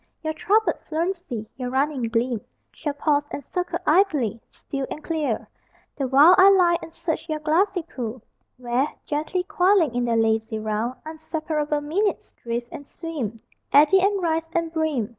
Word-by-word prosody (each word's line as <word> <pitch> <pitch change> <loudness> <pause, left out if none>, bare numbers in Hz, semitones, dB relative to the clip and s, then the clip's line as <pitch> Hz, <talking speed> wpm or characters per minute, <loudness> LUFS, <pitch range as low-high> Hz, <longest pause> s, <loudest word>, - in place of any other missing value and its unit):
Your 315 0 -1
troubled 395 +2 +1
fluency, 330 - -2
your 250 -2 -3
running 270 +1 0
gleam 230 0 0 0.3
Shall 295 -3 -4
pause, 290 0 +1
and 280 - -6
circle 360 -1 -2
idly, 300 - +2
still 275 -1 -5
and 300 - -7
clear: 300 -9 -2 0.5
The 275 -3 -2
while 285 +7 +7
I 380 +1 +9
lie 350 -3 +4
and 325 - -9
search 330 0 -4
your 310 - 0
glassy 345 +5 +1
pool 245 -7 -6 0.3
Where, 250 +3 0 0.2
gently 310 +5 -1
coiling 365 - +3
in 245 0 0
their 230 -1 +1
lazy 220 0 +1
round, 220 +3 -2
Unseparable 310 -1 -2
minutes 380 +8 -1
drift 235 0 -5
and 285 - -9
swim, 265 - -5 0.3
Eddy 305 +7 +6
and 400 +1 +2
rise 325 -1 0
and 335 -1 -1
brim. 310 -9 0
305 Hz, 160 wpm, -24 LUFS, 245-335 Hz, 0.5 s, I